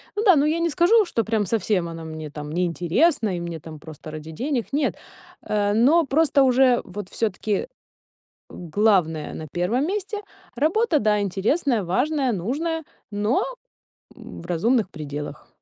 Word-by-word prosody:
Ну 420 - -1
да, 380 -6 +7
ну, 285 +1 +3
я 320 +2 +1
не 335 - +1
скажу, 360 +8 +4
что 230 -10 -1
прям 220 -2 0
совсем 195 -4 0
она 165 0 -7
мне 155 -1 -7
там 150 0 -7
не 180 +3 +1
интересна 185 - +1
и - - -3
мне 170 -1 -5
там 155 0 -10
просто 155 0 -10
ради 155 +1 -8
денег, 250 - -2
нет, 290 +2 0 0.5
а. 205 -1 0
Но 290 +9 +4
просто 285 0 +3
уже 255 -1 +4
вот 190 0 -8
всё-таки 215 - -1 0.8
главная 175 -3 +1
на 155 - -7
1 225 +11 0
месте, 410 +2 -3 0.3
работа, 320 - +2
да, 210 -1 +2
интересная, 215 - 0
важная, 270 - +1
нужная, 295 - -2 0.3
но, 210 +4 +1 0.7
м, - - -11
в - - -10
разумных 210 +5 +1
пределах. 145 -3 -7
215 Hz, 160 wpm, -23 LUFS, -, 0.8 s, да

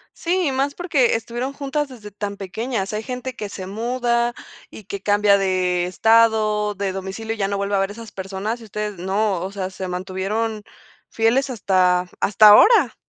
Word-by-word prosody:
Sí, 355 0 0
y - - 0
más 275 +2 -1
porque, 290 -10 +2
estuvieron 240 +4 -4
juntas 285 +1 -2
desde 220 -6 -11
tan 200 0 -5
pequeñas. 200 +2 -4
Hay 215 - -3
gente 250 +1 -5
que 210 - -5
se 190 -2 -8
muda 235 +3 0 0.4
y 215 - -12
que 200 0 -7
cambia 205 0 +4
de 185 -2 0
estado, 215 +1 +3
de 195 0 -2
domicilio, 195 +4 -5
y - - -14
ya 195 - 0
no 200 - -2
vuelve 200 0 -1
a - - +2
ver 195 +1 0
esas 225 0 -10
personas, 195 +4 -4
y 230 - -12
ustedes 210 -1 -5
no, 195 0 0
o 190 +2 -4
sea, 190 -2 -4
se 185 0 -6
mantuvieron 195 +4 -3 0.5
fieles 240 +5 +1
hasta 185 -5 +2
hasta 210 +1 +6
ahora. 320 - +6
210 Hz, 185 wpm, -21 LUFS, 195-235 Hz, 0.5 s, hasta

